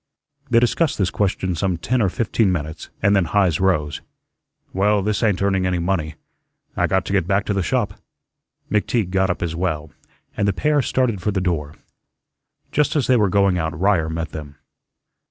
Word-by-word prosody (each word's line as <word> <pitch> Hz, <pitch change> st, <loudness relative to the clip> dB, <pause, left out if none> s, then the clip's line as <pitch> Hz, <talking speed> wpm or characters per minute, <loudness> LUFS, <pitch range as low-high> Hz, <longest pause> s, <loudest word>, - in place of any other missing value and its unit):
They 115 Hz, -, +5 dB
discussed 125 Hz, +7 st, +1 dB
this 95 Hz, -4 st, 0 dB
question 95 Hz, -2 st, -1 dB
some 90 Hz, +1 st, -1 dB
ten 120 Hz, +9 st, 0 dB
or 100 Hz, -, +2 dB
fifteen 110 Hz, -1 st, +1 dB
minutes 80 Hz, -2 st, -4 dB
and 100 Hz, +1 st, +4 dB
then 95 Hz, -3 st, +3 dB
Heise 90 Hz, -3 st, +2 dB
rose. 75 Hz, -6 st, 0 dB, 0.7 s
"Well, 100 Hz, +1 st, +2 dB
this 105 Hz, -1 st, -1 dB
ain't 105 Hz, -4 st, +1 dB
earning 95 Hz, -2 st, +1 dB
any 90 Hz, -1 st, 0 dB
money. 85 Hz, -3 st, -1 dB, 0.6 s
I -, -, +1 dB
got 95 Hz, -1 st, 0 dB
to -, -, -3 dB
get 95 Hz, -4 st, +1 dB
back 100 Hz, +1 st, +1 dB
to 100 Hz, -, -1 dB
the 100 Hz, -, 0 dB
shop." 85 Hz, -, -1 dB, 0.7 s
McTeague 105 Hz, -2 st, 0 dB
got 95 Hz, 0 st, +2 dB
up 90 Hz, -, -2 dB
as 85 Hz, -1 st, -2 dB
well, 80 Hz, -4 st, -2 dB, 0.4 s
and 100 Hz, -, 0 dB
the 100 Hz, -, +2 dB
pair 150 Hz, +8 st, +2 dB
started 120 Hz, -6 st, 0 dB
for 105 Hz, -, -1 dB
the 100 Hz, -2 st, 0 dB
door. 80 Hz, -5 st, -2 dB, 1.0 s
Just 150 Hz, +1 st, +1 dB
as 145 Hz, -5 st, +2 dB
they 130 Hz, -, +4 dB
were 105 Hz, -4 st, +3 dB
going 100 Hz, -2 st, +2 dB
out 80 Hz, -1 st, -3 dB
Ryer 95 Hz, -4 st, +2 dB
met 80 Hz, 0 st, -3 dB
them. 75 Hz, -2 st, -8 dB
95 Hz, 190 wpm, -21 LUFS, 85-105 Hz, 1.0 s, They